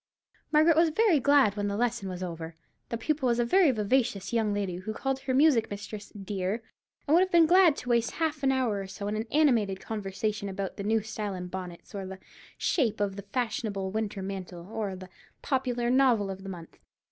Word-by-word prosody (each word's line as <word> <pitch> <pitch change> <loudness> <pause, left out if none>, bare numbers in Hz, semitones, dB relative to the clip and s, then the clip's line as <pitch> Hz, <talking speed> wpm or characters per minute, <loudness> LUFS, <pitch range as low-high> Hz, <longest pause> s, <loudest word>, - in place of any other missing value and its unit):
Margaret 310 +1 +5
was 330 +1 +4
very 365 -1 +3
glad 275 -7 +4
when 205 -1 -1
the 200 0 -2
lesson 235 -4 -1
was 185 0 -5
over. 165 -2 -6 0.3
The 230 - -2
pupil 280 +3 0
was 235 -1 +2
a 240 - +2
very 360 +6 +5
vivacious 220 -3 0
young 220 -3 +1
lady, 200 -3 -2
who 210 +4 -5
called 270 +2 -2
her 265 -1 -2
music 275 -5 +4
mistress 205 +1 -7
"dear," 200 +2 -3 0.4
and 290 - +2
would 335 - +7
have 375 0 +1
been 335 -1 +6
glad 350 -2 +6
to 250 - -7
waste 235 -1 +2
half 315 -3 -1
an 270 -1 +3
hour 250 -6 0
or 195 - -6
so 200 +1 -6
in 210 - -1
an 220 +2 -3
animated 235 -11 +3
conversation 210 0 -3
about 195 0 -4
the - - -6
last 200 - -4
new 220 0 +2
style 210 -2 -4
in 180 0 -6
bonnets, 180 -2 -8
or 195 -2 -5
the 190 0 -7 0.4
shape 250 - +1
of 200 -2 -1
the 200 -1 -8
fashionable 215 -6 -2
winter 210 -2 -3
mantle, 185 -3 -6
or 210 -4 -3
the 185 0 -10 0.4
popular 250 -3 0
novel 245 -7 +3
of 190 0 -8
the 195 - -8
month. 170 -3 -10
220 Hz, 215 wpm, -28 LUFS, 195-265 Hz, 0.4 s, would